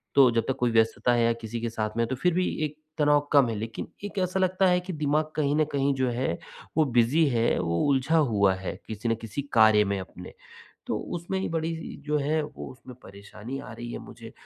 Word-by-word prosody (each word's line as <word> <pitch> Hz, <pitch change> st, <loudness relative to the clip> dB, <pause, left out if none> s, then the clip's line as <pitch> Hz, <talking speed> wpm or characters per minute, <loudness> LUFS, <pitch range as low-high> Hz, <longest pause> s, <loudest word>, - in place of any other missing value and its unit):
तो 135 Hz, -2 st, +7 dB
जब 115 Hz, 0 st, +1 dB
तक 135 Hz, -, 0 dB
कोई 125 Hz, -1 st, +2 dB
व्यस्तता 115 Hz, +2 st, +2 dB
है, 120 Hz, -1 st, +3 dB
या 115 Hz, -, +3 dB
किसी 115 Hz, 0 st, -6 dB
के 115 Hz, -, -1 dB
साथ 110 Hz, -1 st, -3 dB
में 115 Hz, -, +2 dB
तो 130 Hz, -, -2 dB
फिर 180 Hz, +7 st, +1 dB
भी 180 Hz, +1 st, +1 dB, 0.2 s
एक 150 Hz, 0 st, -7 dB, 0.2 s
तनाव 150 Hz, -1 st, +4 dB
कम 140 Hz, -4 st, +6 dB
है, 110 Hz, -, -2 dB
लेकिन 115 Hz, +2 st, -5 dB, 0.2 s
एक 205 Hz, -, -8 dB
ऐसा 185 Hz, +1 st, 0 dB
लगता 185 Hz, 0 st, +2 dB
है 180 Hz, 0 st, +4 dB
कि 185 Hz, 0 st, -6 dB
दिमाग 155 Hz, +1 st, 0 dB
कहीं 145 Hz, -1 st, +1 dB
न 155 Hz, -, +3 dB
कहीं 140 Hz, 0 st, +1 dB
जो 130 Hz, -1 st, +1 dB
है, 120 Hz, -7 st, -1 dB, 0.4 s
वो 155 Hz, -, +5 dB
बिज़ी 125 Hz, +5 st, +3 dB
है। 115 Hz, -2 st, +2 dB
वो 85 Hz, -1 st, 0 dB
उलझा 140 Hz, +4 st, +2 dB
हुआ 105 Hz, -10 st, +3 dB
है, 95 Hz, 0 st, -5 dB
किसी 110 Hz, +1 st, -3 dB
न 115 Hz, -, +2 dB
किसी 115 Hz, +5 st, -4 dB
कार्य 110 Hz, -2 st, +6 dB
में 100 Hz, -1 st, -1 dB
अपने, 90 Hz, -1 st, -10 dB, 0.5 s
तो -, -, -1 dB
उसमें 175 Hz, +3 st, -3 dB
ही -, -, -2 dB
बड़ी 165 Hz, 0 st, -1 dB
जी 160 Hz, -, -8 dB
जो 150 Hz, 0 st, +1 dB
है, 150 Hz, +2 st, 0 dB
वो 150 Hz, -1 st, -8 dB
उसमें 125 Hz, 0 st, -13 dB
परेशानी 105 Hz, +6 st, -9 dB
आ -, -, -10 dB
रही 120 Hz, +1 st, -7 dB
है -, -, -4 dB
मुझे, -, -, -11 dB
130 Hz, 235 wpm, -27 LUFS, 115-155 Hz, 0.5 s, तो